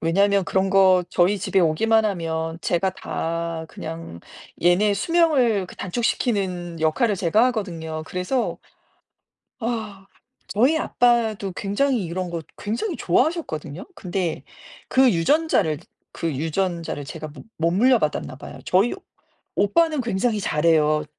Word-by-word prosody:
왜냐하면 200 Hz, +3 st, +2 dB
그런 190 Hz, +3 st, +1 dB
거 190 Hz, -2 st, +5 dB
저희 190 Hz, +3 st, +2 dB
집에 190 Hz, +1 st, +1 dB
오기만 220 Hz, +8 st, +3 dB
하면 165 Hz, -4 st, -2 dB
제가 180 Hz, +2 st, 0 dB
다 165 Hz, -3 st, -4 dB
그냥 165 Hz, -, -8 dB, 0.4 s
얘네 195 Hz, +4 st, +4 dB
수명을 260 Hz, -, +2 dB
그 -, -, -13 dB
단축시키는 185 Hz, -5 st, -2 dB
역할을 195 Hz, +8 st, +2 dB
제가 190 Hz, +6 st, +3 dB
하거든요. 165 Hz, -9 st, -3 dB
그래서 185 Hz, +8 st, -2 dB, 1.0 s
아 215 Hz, -4 st, -4 dB, 0.4 s
저희 255 Hz, +10 st, +3 dB
아빠도 225 Hz, -, +1 dB
굉장히 215 Hz, +4 st, 0 dB
이런 175 Hz, +1 st, -4 dB
거 165 Hz, -1 st, -4 dB, 0.2 s
굉장히 235 Hz, -, -3 dB
좋아하셨거든요. 175 Hz, -, -1 dB
근데 180 Hz, -, -3 dB, 0.5 s
그 260 Hz, -1 st, +5 dB
유전자를 170 Hz, -, +2 dB, 0.3 s
그 165 Hz, -4 st, -3 dB
유전자를 165 Hz, 0 st, -2 dB
제가 155 Hz, +2 st, -7 dB
못 145 Hz, -3 st, -12 dB
못 165 Hz, +1 st, +1 dB
물려받았나 205 Hz, -, +2 dB
봐요. 140 Hz, 0 st, -10 dB
저희 195 Hz, +6 st, +3 dB, 0.6 s
오빠는 310 Hz, +8 st, +2 dB
굉장히 225 Hz, -1 st, 0 dB
잘해요. 155 Hz, -3 st, +2 dB
190 Hz, 285 characters per minute, -23 LUFS, 165-225 Hz, 1.0 s, 거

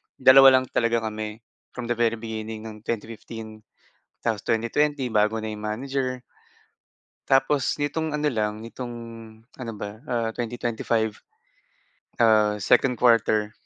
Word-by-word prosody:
2 135 Hz, +1 st, +8 dB
lang -, -, -8 dB
talaga 115 Hz, -1 st, +1 dB
kami 110 Hz, +1 st, -6 dB, 0.3 s
from 120 Hz, -1 st, -4 dB
the -, -, +1 dB
very 115 Hz, -1 st, +2 dB
beginning 110 Hz, -1 st, -6 dB
ng 110 Hz, -1 st, -10 dB
2015 110 Hz, -1 st, -6 dB, 0.6 s
tapos 110 Hz, -3 st, -2 dB
2020 130 Hz, +4 st, 0 dB
bago 110 Hz, 0 st, +1 dB
na 110 Hz, -, -4 dB
'yong 105 Hz, 0 st, -6 dB
manager. 130 Hz, +3 st, -2 dB, 1.1 s
Tapos, 135 Hz, 0 st, +2 dB
nitong 150 Hz, +2 st, -2 dB
ano 150 Hz, 0 st, 0 dB
lang 105 Hz, -2 st, -1 dB
nitong 120 Hz, +1 st, -7 dB, 0.6 s
ano 120 Hz, -3 st, -5 dB
ba, 105 Hz, +2 st, -7 dB
ah, 115 Hz, -2 st, 0 dB
2025. 115 Hz, -2 st, -1 dB, 1.1 s
Ah, 110 Hz, -2 st, +4 dB
2nd 125 Hz, +3 st, +3 dB
quarter 110 Hz, -3 st, +3 dB
115 Hz, 125 wpm, -25 LUFS, 110-125 Hz, 1.1 s, 2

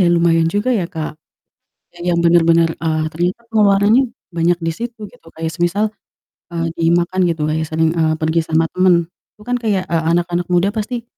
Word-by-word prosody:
ya 180 Hz, -, +4 dB
lumayan 165 Hz, -1 st, +3 dB
juga 205 Hz, +4 st, -1 dB
ya, -, -, -2 dB
Kak, 155 Hz, -1 st, -6 dB, 0.8 s
e -, -, -17 dB
yang 170 Hz, -1 st, +2 dB
bener-bener, 170 Hz, -1 st, +4 dB
eee, 155 Hz, -1 st, 0 dB
ternyata 175 Hz, +6 st, -2 dB
pengeluarannya 210 Hz, +3 st, +4 dB, 0.3 s
banyak 170 Hz, +1 st, +2 dB
di 165 Hz, -, 0 dB
situ 235 Hz, 0 st, -6 dB
gitu 245 Hz, -9 st, -22 dB
kayak 160 Hz, 0 st, -3 dB
semisal, 175 Hz, +5 st, 0 dB, 0.7 s
eee, 165 Hz, -1 st, -2 dB
dimakan 175 Hz, +3 st, +1 dB
gitu 165 Hz, -2 st, -2 dB
kayak 160 Hz, +1 st, -1 dB
sering, 160 Hz, 0 st, +1 dB
eee, 160 Hz, -1 st, +2 dB
pergi 160 Hz, +1 st, 0 dB
sama 160 Hz, +1 st, +2 dB
temen 175 Hz, -2 st, +2 dB, 0.2 s
itu -, -, -22 dB
kan 245 Hz, +3 st, -1 dB
kayak, 210 Hz, -5 st, 0 dB
eee, 165 Hz, -1 st, +1 dB
anak-anak 175 Hz, 0 st, -1 dB
muda 175 Hz, +3 st, +3 dB
pasti 225 Hz, +2 st, -4 dB
170 Hz, 175 wpm, -18 LUFS, 165-195 Hz, 0.8 s, ya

